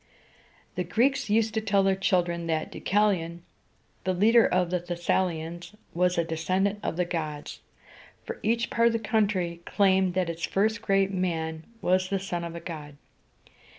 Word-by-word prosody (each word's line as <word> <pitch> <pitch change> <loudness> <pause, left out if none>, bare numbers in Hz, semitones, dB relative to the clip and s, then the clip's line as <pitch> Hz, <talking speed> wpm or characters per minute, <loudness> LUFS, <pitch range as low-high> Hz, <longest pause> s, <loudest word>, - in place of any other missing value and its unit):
The 180 - -2
Greeks 235 +7 +1
used 220 +1 +2
to 220 - 0
tell 200 -2 +2
their 195 0 +3
children 175 -3 0
that 160 -1 -1
Deu - - -8
ca´li 205 -3 +2
on, 170 +1 -9 0.6
the 185 0 0
leader 225 +5 +5
of 180 -1 +1
the 180 - +1
Thes 175 0 -7
sa´li 180 -3 +2
ans, 170 +5 -8 0.2
was 180 +1 +1
a 170 - +3
descendant 185 +5 -1
of 165 - -3
the 180 - +1
gods, 155 -4 -4 0.6
for 465 -1 -7
each 230 +2 0
part 230 0 +4
of 235 - +2
the - - +2
country 200 -6 0
claimed 190 -2 +2
that 185 -2 +1
its 170 0 -5
first 215 +3 +1
great 195 -2 +2
man 160 -4 -2 0.2
was 185 +1 +2
the 200 - +1
son 180 -3 -4
of 170 0 -6
a - - -5
god. 150 -4 -8
185 Hz, 185 wpm, -27 LUFS, 170-205 Hz, 0.6 s, leader